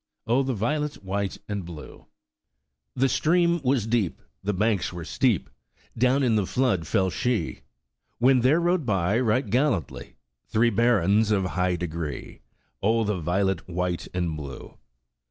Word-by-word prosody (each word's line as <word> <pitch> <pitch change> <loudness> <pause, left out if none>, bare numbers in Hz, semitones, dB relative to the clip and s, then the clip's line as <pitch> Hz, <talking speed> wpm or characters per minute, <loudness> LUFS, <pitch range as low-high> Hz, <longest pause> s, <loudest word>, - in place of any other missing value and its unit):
Oh, 120 +4 +2
the 130 -2 -1
violet, 145 +5 -2
white 100 +1 -2
and 105 -3 -3
blue! 85 -3 -11 0.9
The 135 +1 +3
stream 170 +4 +2
was 130 -4 +1
deep, 110 -6 0 0.2
The 105 - 0
banks 105 -1 0
were 85 -2 -7
steep, 125 - +1 0.5
Down 130 +4 +2
in 120 -3 +3
the 105 -4 +1
flood 105 -11 0
fell 95 -4 +1
she; 125 -3 -1 0.6
When 130 +2 +4
there 130 +7 +4
rode 175 -1 +1
by. 100 -2 +1
Right 125 +1 +1
gallantly, 85 - -1 0.3
Three 115 +2 +2
barons 110 -2 +3
of 100 -3 +2
high 90 0 0
degree, 80 -3 -5 0.4
Oh, 115 +3 +2
the 105 -3 -1
violet, 90 +2 -1
white 90 0 -2
and 85 -3 -2
blue! 70 -3 -9
105 Hz, 145 wpm, -25 LUFS, 90-125 Hz, 0.9 s, When